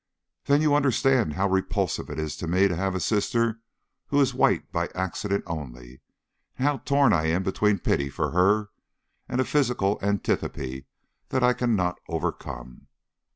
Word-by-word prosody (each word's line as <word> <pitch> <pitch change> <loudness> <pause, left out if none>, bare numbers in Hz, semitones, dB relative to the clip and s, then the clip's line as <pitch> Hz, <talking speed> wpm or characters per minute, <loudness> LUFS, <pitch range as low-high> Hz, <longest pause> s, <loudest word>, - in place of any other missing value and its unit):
"Then 145 +2 +3
you 150 -2 +3
understand 135 - +2
how 95 +6 +1
repulsive 95 0 -1
it 75 - -6
is 80 -1 -3
to 85 - -5
me 95 +4 +3
to 90 - -2
have 95 +2 -1
a - - -1
sister 115 +4 0 0.5
who 145 - +1
is 135 -2 +3
white - - +1
by - - -1
accident 95 +2 -2
only, 65 -6 -8 0.6
and 130 - -1
how 145 -1 +1
torn 140 -4 +3
I 80 -1 +2
am 85 +4 +1
between 100 +2 +1
pity 70 -5 0
for - - -2
her 100 +4 +2 0.6
and 125 - -1
a 130 - +2
physical 120 -8 +1
antipathy 70 -9 -2 0.4
that 130 -1 0
I 125 0 +5
cannot 105 -8 0
overcome?" 65 -6 -5
100 Hz, 160 wpm, -26 LUFS, 80-125 Hz, 0.6 s, I